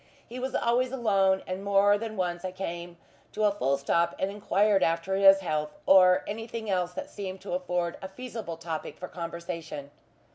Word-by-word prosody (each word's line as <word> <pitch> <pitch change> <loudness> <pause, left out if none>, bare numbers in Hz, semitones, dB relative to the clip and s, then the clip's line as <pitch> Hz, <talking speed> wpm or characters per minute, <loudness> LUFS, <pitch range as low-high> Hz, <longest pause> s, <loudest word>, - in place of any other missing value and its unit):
He 245 +2 -7
was 260 +1 -3
always 245 +2 +1
alone, 195 -7 +2
and 185 +1 -5
more 200 0 +4
than 220 0 -5
once 175 -1 -2
I 185 - -3
came 175 -2 -6 0.4
to 215 - -1
a 210 - +5
full 140 -9 0
stop 170 +5 +1
and 190 - -1
enquired 205 0 +2
after 165 +3 +1
his 195 0 +7
health, 150 -3 -2
or 185 -1 +6
anything 225 0 -5
else 180 -1 0
that - - -6
seemed 190 -2 -6
to 195 - -6
afford 180 -1 -1
a 190 - -6
feasible 225 -6 -7
topic 165 -1 -5
for 180 - -6
conversation. 170 -4 -6
190 Hz, 180 wpm, -28 LUFS, 170-205 Hz, 0.4 s, his